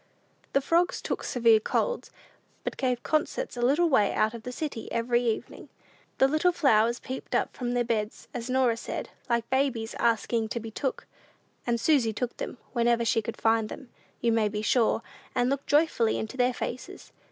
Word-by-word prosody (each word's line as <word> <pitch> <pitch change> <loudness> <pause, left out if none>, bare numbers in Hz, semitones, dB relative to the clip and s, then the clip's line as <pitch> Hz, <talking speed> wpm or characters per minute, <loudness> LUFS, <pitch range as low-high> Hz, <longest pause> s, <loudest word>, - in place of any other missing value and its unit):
The 275 - +3
frogs 340 +5 +2
took - - -3
severe 230 -3 +4
colds, - - -1 0.5
but - - -3
gave 250 -2 -1
concerts 310 - -1
a 240 - -4
little 290 +8 +4
way 215 -10 +3
out 215 +1 +2
of 235 - -7
the 250 - -6
city 265 -4 -5
every 240 +1 +1
evening. 230 -3 -3 0.5
The 265 - +5
little 310 +5 +3
flowers 235 -8 +3
peeped 260 - -5
up - - 0
from 245 -1 -2
their 245 - +2
beds, 220 -2 -2
as 245 0 -5
Norah 255 -3 +2
said, - - -5 0.2
"like 235 -1 +1
babies 260 -4 0
asking 230 0 +1
to 235 - -3
be 225 0 -7
took;" 265 +4 -3 0.6
and 235 -1 +1
Susy 250 -6 +3
took 245 +3 -3
them; - - -5 0.2
whenever 235 0 +2
she 225 - +2
could 230 +1 -6
find 225 -1 +2
them, 265 - -9 0.3
you 235 - +2
may 225 -2 +2
be 210 0 -3
sure, 230 0 +2 0.3
and 245 +1 +2
looked 275 0 -2
joyfully 290 -7 +3
into 220 +4 -4
their 250 -1 +2
faces. 250 - -6
240 Hz, 185 wpm, -28 LUFS, 225-265 Hz, 0.6 s, The